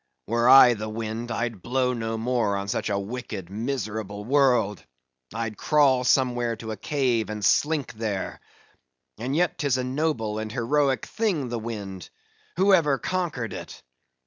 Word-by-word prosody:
Were 115 +3 +2
I 130 -2 +9
the 110 -1 -5
wind, 110 +2 -4
I'd 115 -3 -3
blow 125 +2 0
no 115 -1 -3
more 115 -3 0
on 100 0 -4
such 115 - -2
a 100 - 0
wicked, 100 -3 -6
miserable 110 -3 -4
world. 125 -7 +2 0.5
I'd 115 -2 -4
crawl 140 -4 +3
somewhere 120 -2 +2
to 110 0 -7
a - - -3
cave, 120 -1 0
and 105 -1 -3
slink 150 -3 +2
there. 110 -3 -4 0.8
And 130 +5 -2
yet, 175 +1 +1
'tis 140 -4 +1
a 130 - -1
noble 130 -6 -1
and 110 0 -5
heroic 135 +3 +1
thing, 185 - -1
the 120 -1 -3
wind! 100 -5 -6 0.5
who 195 +2 +4
ever 150 -7 +4
conquered 155 - -3
it? - - -9
120 Hz, 155 wpm, -25 LUFS, 110-135 Hz, 0.8 s, I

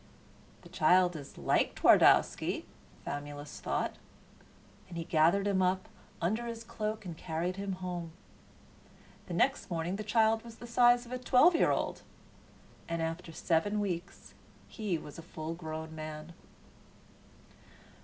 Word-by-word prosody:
"The - - -13
child 180 +2 +4
is 145 -3 -9
like - - +1
Twardowski," - - +4 0.4
Famulus 145 0 -6
thought, - - -2 0.9
and 170 - -7
he 165 - -2
gathered 165 +5 +3
him 195 -2 +2
up 185 +1 +1 0.3
under 220 +8 -1
his 230 -1 -6
cloak 215 -2 -4
and 170 -3 -6
carried 170 +3 -3
him 200 -1 -3
home. 180 -2 -5 1.2
The - - -4
next - - +1
morning 170 +2 -2
the 215 - -4
child 220 +1 +3
was 230 -1 -11
the 240 - -10
size 240 +1 +4
of 240 - -13
a 255 - -3
twelve 255 +7 +5
year 335 - +3
old; - - -1 0.9
and 165 0 -1
after 165 +1 -3
seven 175 +6 0
weeks 185 -3 -4 0.3
he 205 -7 -2
was 150 0 -10
a - - -6
full 160 -1 -6
grown 160 -1 -6
man. 155 +1 -7
180 Hz, 140 wpm, -31 LUFS, 160-215 Hz, 1.2 s, twelve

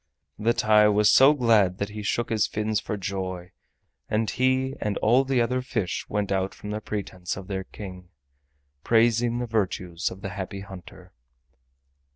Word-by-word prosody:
The 115 +2 +2
TAI 105 0 +5
was 105 0 +4
so 135 +3 +7
glad 110 -8 +3
that 100 +1 -3
he 105 +1 -7
shook 115 +3 -1
his 110 -1 +2
fins 110 0 -1
for 105 - -4
joy, 95 -2 -5 0.6
and 110 +1 0
he 130 +1 +1
and 105 -2 -1
all 120 +5 +4
the 135 -2 0
other 125 +2 +1
fish 115 -8 -3
went 105 -1 -1
out 95 0 -1
from 105 - -8
the 105 +1 -3
presence 95 -4 -5
of 95 - -8
their 95 -2 -4
King, 90 -3 -10 0.7
praising 115 +1 +3
the 125 - -2
virtues 90 -6 -2
of 95 - -11
the 95 - -4
Happy 100 +1 -6
Hunter. 95 -1 -12
105 Hz, 170 wpm, -25 LUFS, 95-115 Hz, 0.7 s, so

